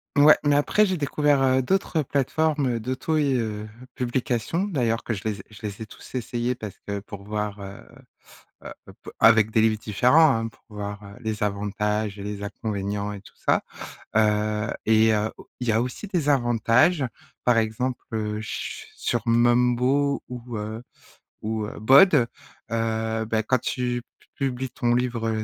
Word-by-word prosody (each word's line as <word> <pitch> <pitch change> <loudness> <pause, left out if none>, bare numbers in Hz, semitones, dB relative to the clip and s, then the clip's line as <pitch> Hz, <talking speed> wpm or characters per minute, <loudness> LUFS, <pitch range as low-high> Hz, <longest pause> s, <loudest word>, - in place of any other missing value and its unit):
Ouais, 145 +2 +7
mais 145 0 +4
après, 180 +9 +3
j'ai 190 -2 0
découvert, 145 -1 +2
heu, 130 0 +3
d'autres 165 0 0
plateformes, 145 +2 0
heu, - - -2
d'auto, 130 +7 -2
i 145 -3 +2
heu, 110 -3 -2 0.3
publication, 125 - -1
d'ailleurs, 120 - 0
que 115 - -2
je 95 - -7
les 105 -2 -2
ai - - -9
je 110 - -14
les 105 0 -5
ai - - -4
tous - - -14
essayées 120 0 -1
parce 110 -6 -8
que 100 0 -2
pour 100 0 -10
voir, 105 0 -3
heu, 100 0 -8 0.8
heu, - - -6 0.3
p - - -9
avec 110 -1 +6
des 110 - +3
livres 110 0 +3
différents, 125 +10 +4
hein, 115 0 -1
pour 115 - -22
voir, 105 0 -6
heu, 100 0 -11
les 110 -1 -3
avantages 105 +1 -1
et - - -6
les 100 0 -5
inconvénients 100 -1 -3
et 100 - -7
tout - - -18
ça. - - +1 0.6
Heu 105 0 +2 0.2
et 110 0 +5
heu, 105 +1 0
au - - -14
il 125 - -3
y - - +5
a 110 +1 +2
aussi 125 - -5
des 175 -7 -1
avantages, 130 +3 +3 0.4
par 120 -2 +4
exemple, 115 +3 -1
heu, 105 -1 -2
ch 110 - -6
sur 120 - -1
Mumbo 125 +4 +3
ou, 120 -2 -7
heu, 110 +2 -5 0.6
ou, 110 0 -2
heu, 105 - -8
BoD, 135 - +6 0.4
heu, 110 0 -1
bah 110 0 0
quand 130 +4 +2
tu 125 -1 -2 0.2
p - - -25
publies 130 -1 -2
ton 120 0 0
livre, 120 -2 0
heu, 110 -1 -1
115 Hz, 180 wpm, -25 LUFS, 105-130 Hz, 0.8 s, Ouais